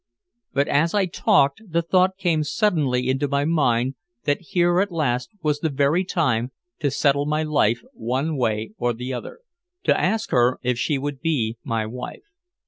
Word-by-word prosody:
But 140 +1 +1
as 165 +6 +2
I 200 -2 +3
talked, 175 -4 +2
the 170 -5 -1
thought 185 +2 +2
came 170 -5 +1
suddenly 145 - +1
into 135 +2 +1
my 140 +1 0
mind 130 -6 +2 0.3
that 145 -1 0
here 175 +1 +2
at 200 0 +1
last 125 -7 -1
was 150 -1 +1
the 160 - 0
very 145 +5 +2
time 130 - 0 0.3
to 145 - +1
settle 140 +1 +1
my 155 +1 0
life 120 -7 +1
one 130 +7 -2
way 110 -4 -1
or 120 0 +1
the 125 +3 -5
other, 125 - -7 0.4
to - - +3
ask 215 +4 0
her 125 +1 +3
if 125 -1 0
she 150 +1 +1
would 140 0 -4
be 120 -9 -1
my 115 -1 -1
wife. 125 - -7
145 Hz, 175 wpm, -23 LUFS, 125-165 Hz, 0.4 s, I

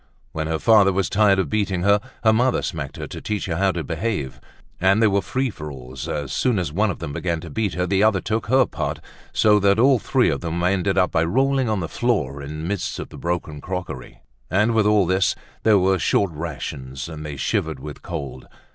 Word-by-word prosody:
When 80 0 -3
her 80 0 0
father 105 +1 +5
was 95 -1 -1
tired 105 -2 +4
of 95 -4 +1
beating 95 0 -1
her, 100 +1 +4 0.2
her 110 -1 +5
mother 125 +3 +2
smacked 75 -6 -4
her - - -5
to - - -8
teach 105 -1 -2
her 85 -3 -2
how 95 0 +3
to 85 - -3
behave. 85 - -3 0.4
And 95 +3 +4
there 110 -2 +4
were 100 0 +2
free 130 +3 -1
for 75 -5 -7
alls; 65 -1 -8
as 70 -3 -3
soon 125 -5 +1
as 85 -5 -2
one 105 +5 +2
of 90 - -3
them 70 - -6
began 85 0 -2
to 80 - -9
beat 100 -2 -1
her, 90 0 0
the 95 +1 +1
other 105 -2 +4
took 110 +4 -2
her 130 +2 +4
part, - - -4 0.3
so 105 -1 +4
that 100 0 +3
all 130 +2 +5
three 130 +2 +2
of - - -3
them 85 0 -3
ended 95 +1 +1
by 80 - +2
rolling 130 +7 +1
on 105 -3 0
the 80 - -3
floor 80 - -1
in 75 +2 -6
the - - -3
midst 100 -1 -2
of - - -6
the - - -11
broken 85 -4 -3
crockery. 90 -8 -6 0.3
And 105 +6 +2
with 110 -2 +3
all 105 -2 +4
this, 95 +3 +2 0.3
there 110 -2 +5
were 95 0 +2
short 100 -3 +2
rations 70 -4 -6
and 80 -2 -7
they 75 -2 -6
shivered - - -1
with 75 -2 -8
cold. 70 -7 -6
95 Hz, 225 wpm, -22 LUFS, 80-105 Hz, 0.4 s, father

